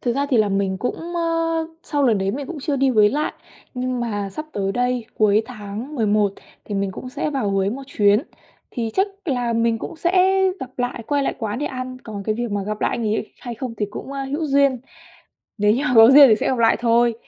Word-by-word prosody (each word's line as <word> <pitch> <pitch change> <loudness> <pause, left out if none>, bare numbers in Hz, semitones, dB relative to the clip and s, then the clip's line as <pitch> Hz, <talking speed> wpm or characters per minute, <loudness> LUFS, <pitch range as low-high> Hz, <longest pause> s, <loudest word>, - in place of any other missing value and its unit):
Thực 240 - 0
ra 280 +2 0
thì 255 - +3
là 215 -2 +3
mình 195 -1 -1
cũng, 335 - -4
ơ, 330 -1 0 0.2
sau 290 -2 -1
lần 225 -5 +3
đấy 190 0 0
mình 275 +5 -5
cũng 340 -4 -7
chưa 285 0 -1
đi 270 0 +2
Huế 215 -4 +5
lại, 295 +7 -1 0.4
nhưng 250 0 -2
mà 205 -4 -3
sắp 310 +10 -6
tới 195 -1 -1
đây, 245 0 0
cuối 215 0 +3
tháng 225 +3 -7
11 210 -5 +2 0.3
thì 205 - -5
mình 195 0 -1
cũng 255 - -8
sẽ 280 +3 -3
vào 265 -8 -1
Huế 195 0 +1
một 270 +4 -5
chuyến, 210 -2 +3 0.5
thì 230 -3 -3
chắc 385 - +3 0.2
là 245 -7 -1
mình 230 0 +1
cũng - - -7
sẽ 370 +3 +3 0.2
gặp 260 - -6
lại, 245 -1 -2
quay 285 -1 +1
lại - - -1
quán 220 -1 -3
để 295 - -2
ăn, 255 -1 -5
còn 205 -3 -6
cái 215 +2 -1
việc 240 0 -3
mà 205 -1 -1
gặp 210 +2 -4
lại - - +1
anh 235 - -3
ấy 215 0 -2
hay 240 -2 -6
không 245 0 -5
thì 210 -2 -2
cũng, 265 - -7
ơ, 275 -1 -3
hữu 290 +4 -3
duyên, 275 -2 +3 0.8
nếu 210 0 +4
như 250 +5 0
mà 250 - 0
có 225 +1 +9
duyên 280 0 +9
thì 220 - +6
sẽ - - -2
gặp 260 - 0
lại 225 -1 +4
thôi. 235 0 +3
240 Hz, 245 wpm, -21 LUFS, 210-275 Hz, 0.8 s, có